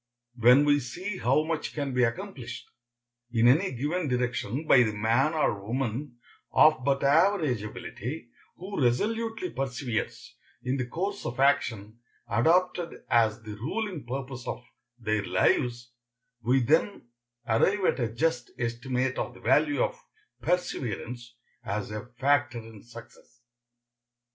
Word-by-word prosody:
When 125 Hz, +4 st, +6 dB
we 145 Hz, 0 st, +4 dB
see 185 Hz, -, -5 dB
how 135 Hz, +5 st, +3 dB
much 160 Hz, 0 st, -3 dB
can 140 Hz, -3 st, -2 dB
be 125 Hz, 0 st, +3 dB
accomplished 125 Hz, -2 st, -4 dB, 0.6 s
in 115 Hz, 0 st, +4 dB
any 160 Hz, +10 st, +4 dB
given 150 Hz, +7 st, -1 dB
direction 125 Hz, +2 st, -1 dB
by 135 Hz, -5 st, +6 dB
the 110 Hz, -3 st, +1 dB
man 115 Hz, +9 st, +2 dB
or 110 Hz, -10 st, 0 dB
woman 120 Hz, +3 st, -3 dB, 0.3 s
of 155 Hz, -4 st, +5 dB
but 135 Hz, +1 st, +1 dB
average 155 Hz, -, +3 dB
ability 120 Hz, +5 st, -6 dB, 0.3 s
who 185 Hz, -4 st, -3 dB
resolutely 225 Hz, -, 0 dB
perseveres 125 Hz, -3 st, -4 dB, 0.3 s
in 130 Hz, +2 st, -1 dB
the 125 Hz, -2 st, -2 dB
course 195 Hz, +9 st, -3 dB
of 120 Hz, +2 st, -5 dB
action 115 Hz, -6 st, +1 dB, 0.3 s
adopted 170 Hz, +7 st, +1 dB
as 115 Hz, -1 st, +3 dB
the 105 Hz, -1 st, -7 dB
ruling 170 Hz, -, -3 dB
purpose 130 Hz, 0 st, -6 dB
of 125 Hz, -, -4 dB, 0.3 s
their 110 Hz, -3 st, -1 dB
lives, 120 Hz, +2 st, +1 dB, 0.5 s
we 125 Hz, +4 st, +3 dB
then 160 Hz, -, +1 dB, 0.4 s
arrive 190 Hz, -, +2 dB
at -, -, +2 dB
a 115 Hz, -2 st, -1 dB
just 125 Hz, -1 st, 0 dB
estimate 125 Hz, +2 st, -1 dB
of -, -, -3 dB
the -, -, -13 dB
value 300 Hz, +9 st, +3 dB
of -, -, -4 dB, 0.4 s
perseverance 120 Hz, -, -3 dB, 0.3 s
as 105 Hz, +1 st, -3 dB
a 105 Hz, +3 st, -6 dB
factor 145 Hz, -1 st, +2 dB
in 110 Hz, -2 st, -10 dB
success. 120 Hz, 0 st, -15 dB
125 Hz, 135 wpm, -28 LUFS, 120-155 Hz, 0.6 s, When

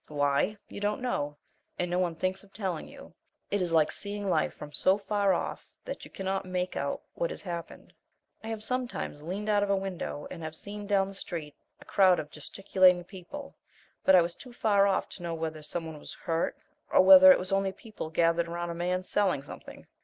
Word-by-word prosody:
Why? 145 Hz, +7 st, +1 dB
You -, -, -8 dB
don't 205 Hz, +1 st, 0 dB
know, 145 Hz, -12 st, -2 dB, 0.4 s
and 180 Hz, 0 st, -1 dB
no 180 Hz, -, +1 dB
one 175 Hz, -3 st, 0 dB
thinks 185 Hz, +4 st, -2 dB
of 200 Hz, -, -20 dB
telling 190 Hz, -6 st, -3 dB
you. -, -, -13 dB, 0.4 s
It 205 Hz, -, +1 dB
is 175 Hz, -2 st, -1 dB
like 160 Hz, -2 st, +4 dB
seeing 205 Hz, 0 st, -2 dB
life 160 Hz, -5 st, +2 dB
from 150 Hz, 0 st, -9 dB
so 190 Hz, +5 st, +4 dB
far 205 Hz, -1 st, +1 dB
off -, -, -2 dB, 0.2 s
that -, -, -6 dB
you -, -, -10 dB
cannot 195 Hz, 0 st, -2 dB
make 185 Hz, -1 st, -2 dB
out -, -, -2 dB
what -, -, -1 dB
has -, -, -6 dB
happened. 170 Hz, -3 st, -7 dB, 0.5 s
I -, -, -7 dB
have 220 Hz, -1 st, -4 dB
sometimes 250 Hz, -, -3 dB
leaned 190 Hz, +7 st, -4 dB
out 205 Hz, -1 st, +3 dB
of 205 Hz, -, 0 dB
a 200 Hz, -, +4 dB
window 190 Hz, -6 st, -4 dB
and 170 Hz, -, -7 dB
have 160 Hz, 0 st, -6 dB
seen 205 Hz, +3 st, -7 dB
down 195 Hz, -2 st, +3 dB
the -, -, -9 dB
street 165 Hz, -6 st, -6 dB, 0.3 s
a -, -, -15 dB
crowd 185 Hz, -2 st, +5 dB
of 150 Hz, 0 st, -5 dB
gesticulating 185 Hz, +3 st, +3 dB
people, 195 Hz, +10 st, -9 dB, 0.5 s
but 190 Hz, -, +7 dB
I 180 Hz, -, +7 dB
was 170 Hz, 0 st, -4 dB
too 250 Hz, +5 st, -12 dB
far 205 Hz, -4 st, +3 dB
off 195 Hz, -, +1 dB
to -, -, -9 dB
know 170 Hz, -1 st, -3 dB
whether 160 Hz, -1 st, -4 dB
some 165 Hz, +2 st, -2 dB
one 160 Hz, -2 st, -7 dB
was -, -, -8 dB
hurt 165 Hz, 0 st, -1 dB, 0.3 s
or -, -, +6 dB
whether 280 Hz, -1 st, +10 dB
it -, -, +7 dB
was 185 Hz, +1 st, -4 dB
only 195 Hz, 0 st, +2 dB
people 210 Hz, -4 st, -8 dB
gathered 170 Hz, +1 st, +2 dB
around 170 Hz, 0 st, -3 dB
a -, -, -3 dB
man 180 Hz, +2 st, -1 dB
selling 185 Hz, -8 st, +1 dB
something. -, -, -11 dB
185 Hz, 215 wpm, -29 LUFS, 165-205 Hz, 0.5 s, whether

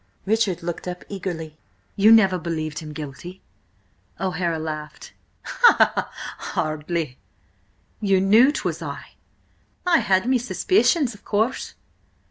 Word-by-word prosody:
Richard 205 Hz, -5 st, 0 dB
looked 175 Hz, +1 st, -5 dB
up 180 Hz, 0 st, -6 dB
eagerly. 165 Hz, -6 st, -6 dB, 0.4 s
"You 210 Hz, +2 st, +5 dB
never 195 Hz, -5 st, +5 dB
believed 155 Hz, -3 st, -4 dB
him 155 Hz, -2 st, -8 dB
guilty?" 155 Hz, +5 st, -9 dB, 0.8 s
O'Hara 180 Hz, -3 st, -1 dB
laughed. 155 Hz, -1 st, -7 dB, 0.3 s
"Hardly!" 160 Hz, -, 0 dB, 0.8 s
"You 195 Hz, -3 st, +2 dB
knew 220 Hz, +8 st, +5 dB
'twas -, -, -3 dB
I?" -, -, -7 dB, 0.7 s
"I 350 Hz, -2 st, +4 dB
had 190 Hz, +1 st, +2 dB
me 255 Hz, -1 st, +3 dB
suspicions, 285 Hz, -, +2 dB
of 205 Hz, -, -17 dB
course." 220 Hz, +5 st, -1 dB
185 Hz, 105 wpm, -23 LUFS, 160-220 Hz, 0.8 s, You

